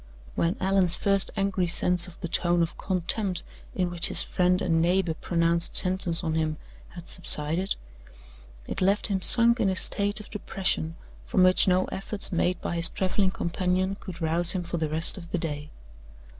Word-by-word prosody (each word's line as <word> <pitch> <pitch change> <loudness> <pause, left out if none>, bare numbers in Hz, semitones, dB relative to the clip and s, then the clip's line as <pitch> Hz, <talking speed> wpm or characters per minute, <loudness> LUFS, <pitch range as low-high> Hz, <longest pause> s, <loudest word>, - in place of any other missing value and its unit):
When 170 +2 -2
Allan's 190 -2 +1
first 195 -1 +4
angry 195 -2 -1
sense 180 +1 +1
of 175 - -15
the 175 - -4
tone 175 0 +1
of 165 - -5
contempt 185 +1 -1 0.3
in 180 -2 -2
which 175 -1 0
his - - +1
friend 180 0 0
and 165 -2 0
neighbor 175 0 0
pronounced 170 +1 -1
sentence 185 -2 0
on 160 -2 -2
him 155 -1 -2 0.3
had 175 -1 -13
subsided, 170 +2 +2 0.9
it - - -6
left 200 +3 +2
him 190 -1 -1
sunk 235 +3 +8
in 205 -4 +1
a 190 - -2
state 205 +2 +1
of 210 - -13
depression 190 -5 -3 0.3
from 185 - +1
which 185 +1 +4
no 185 0 +2
efforts 195 +1 -4
made 175 0 -1
by 170 - -4
his 165 0 +4
traveling 190 +1 -1
companion 185 +1 -2
could 180 -3 -10
rouse 165 +2 +1
him 185 -2 -3
for 170 0 -5
the 160 -2 -3
rest 160 +5 +1
of 170 -2 -13
the 185 - -3
day. 150 -3 -6
180 Hz, 180 wpm, -25 LUFS, 170-190 Hz, 0.9 s, sunk